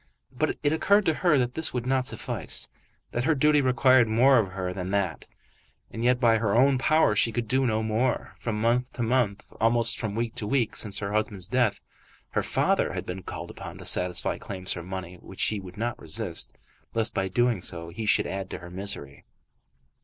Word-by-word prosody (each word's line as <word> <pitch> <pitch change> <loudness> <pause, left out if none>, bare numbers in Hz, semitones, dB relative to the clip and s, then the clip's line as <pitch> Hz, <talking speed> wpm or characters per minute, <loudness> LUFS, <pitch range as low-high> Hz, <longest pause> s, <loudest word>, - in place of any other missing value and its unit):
But - - -1
it 145 - +2
occurred 200 +5 +3
to 160 - +3
her 165 -1 +2
that 125 -1 0
that 160 +2 +1
would 125 -1 -2
not 130 0 +1
suffice; - - -1 0.4
that 120 +1 -2
her 160 - +3
duty 150 +1 +4
required 130 -2 +4
more 125 +4 +5
of 95 -5 -2
her 90 -1 -3
than 90 0 -5
that. 95 -5 -2 0.6
And 115 - -5
yet, 125 0 +3
by 115 -3 +4
her 105 -2 0
own 130 +2 +4
power, 155 -5 +3
she 115 +3 +3
could 115 0 -3
do 130 +3 +2
no 110 -1 0
more. 115 +3 -1
From 110 -3 -3
month 120 +3 +1
to 120 - -3
month, 115 -4 +1 0.2
almost 115 +1 +3
from 105 -3 -3
week 115 0 -2
to 105 - -4
week, 120 -2 0
since 100 -3 +1
her 100 0 -3
husband's 105 -4 0
death, 120 -6 +1 0.5
her - - +1
father - - +1
had - - -4
been 90 +1 -5
called - - -7
upon - - -9
to - - -10
satisfy 90 0 +1
claims 95 -2 -2
for 85 - -6
money 90 0 -7
which - - -5
he 105 - 0
would 90 -1 -11
not 115 +1 -3
resist, 90 +1 -3 0.4
lest 115 -1 +1
by 95 - 0
doing 120 +1 +1
so 85 -1 -3
he 105 +6 -5
should - - +3
add 95 -1 -4
to - - -5
her 85 0 -11
misery. 90 -7 -4
115 Hz, 205 wpm, -26 LUFS, 95-125 Hz, 0.6 s, more